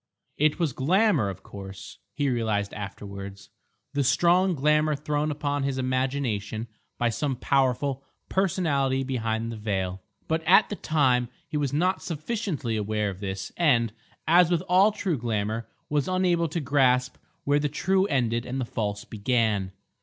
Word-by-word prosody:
It 150 +1 +2
was 165 -7 0
glamour, 160 - +2
of 95 - -8
course, 100 0 -10 0.2
he 145 - 0
realised 110 -5 0
afterwards, 100 -1 -8 0.4
the 140 -1 +1
strong 175 +7 +3
glamour 150 +1 +2
thrown 150 +1 -1
upon 145 -1 -1
his 135 -1 -1
imagination 130 -4 -1 0.3
by 120 - +1
some 135 +4 -1
powerful 135 +1 +1 0.2
personality 145 -8 +1
behind 115 -3 -2
the 115 - -6
veil; 95 -3 -2 0.3
but 160 0 0
at 195 +3 +6
the 205 - -3
time 130 - +2 0.2
he - - -7
was 145 -2 0
not 180 +6 +1
sufficiently 160 - -3
aware 105 -1 -1
of 95 - -11
this 95 -1 -4
and, 120 -10 +3 0.3
as 170 +1 +6
with 175 -2 +2
all 190 +4 +5
true 185 - -2
glamour, 110 -1 -2 0.2
was 145 -2 0
unable 180 -2 +2
to 160 +2 -3
grasp 130 -3 +2 0.3
where 145 +1 +2
the 150 0 0
true 190 +6 +1
ended 120 - 0
and 130 +2 -4
the 130 - -1
false 105 -3 -3
began. 110 -3 0
135 Hz, 155 wpm, -26 LUFS, 110-155 Hz, 0.4 s, at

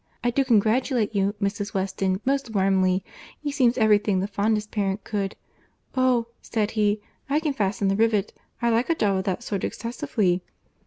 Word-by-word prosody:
I 240 - +2
do 275 +3 +2
congratulate 230 0 +2
you, 200 +1 +1
Mrs. 205 +1 -2
Weston, 190 0 -1
most 270 -4 0
warmly. 190 -1 +2 0.4
He 295 -1 -3
seems 250 -3 +2
every 215 -3 +5
thing 205 -2 0
the 190 - 0
fondest 210 +1 0
parent 200 -1 -1
could.... 200 -2 -2 0.6
'Oh!' 255 -2 +3 0.2
said 215 -2 -1
he, 210 -1 +1 0.3
'I 290 +2 +3
can 305 -3 0
fasten 200 -4 0
the 195 - +2
rivet. 215 -2 +1 0.3
I 235 - +3
like 230 +5 +1
a 330 - +3
job 200 -8 +1
of 190 - -1
that 195 +4 -2
sort 200 -5 -3
excessively. 210 -6 -1
210 Hz, 175 wpm, -25 LUFS, 195-235 Hz, 0.6 s, every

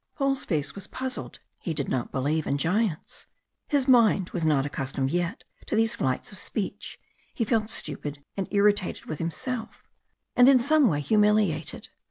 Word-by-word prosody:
Paul's 275 -1 0
face 150 -5 -1
was 200 0 -8
puzzled, 260 0 -5 0.2
he 165 - -3
did 140 -2 -2
not 125 -2 -2
believe 145 +4 -1
in 140 - +1
giants. 180 +2 -1 0.4
His 285 -3 +1
mind 225 -7 +4
was 170 - -3
not 145 -4 +2
accustomed 135 -1 -2
yet 175 +5 -2 0.2
to - - -1
these 225 0 +2
flights 130 +8 -2
of 205 - -8
speech, 205 -4 -4 0.4
he 230 - 0
felt 220 -1 +1
stupid 145 -5 -4
and 195 -2 -2
irritated 205 -2 +1
with 155 - -5
himself, 220 +9 -4 0.5
and 250 +1 +7
in 275 - +7
some 285 +3 +4
way 145 -7 +1
humiliated. 210 0 +1
195 Hz, 165 wpm, -26 LUFS, 150-225 Hz, 0.5 s, and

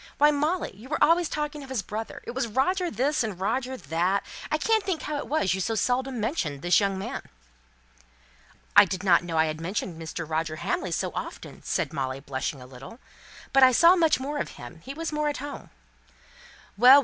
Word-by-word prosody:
Why, 295 +1 +6
Molly, 300 - -1
you 225 +7 -13
were 305 - 0
always 335 +1 +4
talking 300 0 -3
of 275 - -10
his 250 -7 -2
brother 215 +3 -6
it - - -5
was 250 -1 -1
Roger 350 - +1
this, 275 -1 +1
and 210 -5 -4
Roger 250 +6 -1
that 180 +1 0 0.3
I 305 - +3
can't 440 +6 +2
think 375 -5 -2
how 300 - -2
it - - -5
was 275 - +1
you 190 - -2
so 225 +4 -1
seldom 255 +2 0
mentioned 180 - -2
this 175 0 +5
young 195 -2 0
man." 190 - -4 1.5
"I 205 - +10
didn't 185 -2 +3
know 170 -2 -3
I 160 - +5
had 155 0 -4
mentioned 175 -1 -3
Mr. 165 0 -5
Roger 160 0 -1
Hamley - - -2
so - - -1
often," - - -7
said - - -2
Molly, 130 -1 -2
blushing 135 0 -4
a - - -11
little. 135 - -11 0.6
"But 270 - +5
I 260 -1 +8
saw 340 +8 +7
much 325 -6 +3
more 290 +3 -3
of - - -2
him 120 +7 -10
he 270 +8 -8
was 325 +1 -3
more 300 0 0
at 290 - -3
home." 285 +2 -7 1.1
"Well, - - -21
well! 255 +4 +9
240 Hz, 210 wpm, -26 LUFS, -, 1.5 s, I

